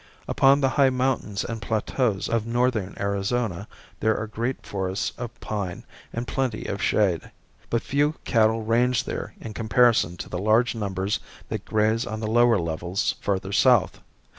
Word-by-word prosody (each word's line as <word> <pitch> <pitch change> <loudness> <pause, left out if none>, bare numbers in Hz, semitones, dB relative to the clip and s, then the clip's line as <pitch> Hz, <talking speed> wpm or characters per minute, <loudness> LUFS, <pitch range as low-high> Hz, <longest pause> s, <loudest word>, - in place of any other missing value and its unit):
Upon 140 +1 +4
the 135 - +3
high 135 0 +4
mountains 125 -6 -1
and 115 -1 -5
plateaus 110 -1 0
of 115 -1 -1
northern 120 -4 0
Arizona 100 0 -1 0.3
there 110 0 +2
are 110 - -2
great 115 +4 -3
forests 95 0 -2
of 120 -1 -7
pine 100 -5 -4 0.3
and 120 +1 -4
plenty 130 -5 -2
of 100 - -3
shade. 95 -6 +1 0.4
But 115 - 0
few 145 +2 +1
cattle 110 -1 +2
range 120 +2 +2
there - - -5
in 110 - -7
comparison 110 -4 +3
to - - -6
the 90 - -4
large 110 +4 +3
numbers 100 -2 -2 0.3
that - - -4
graze 110 +3 +1
on 110 -1 -4
the 110 - -3
lower 120 +1 +4
levels 85 +2 -1
further 95 -1 -1
south. 120 +1 +3
110 Hz, 160 wpm, -25 LUFS, 100-120 Hz, 0.4 s, Upon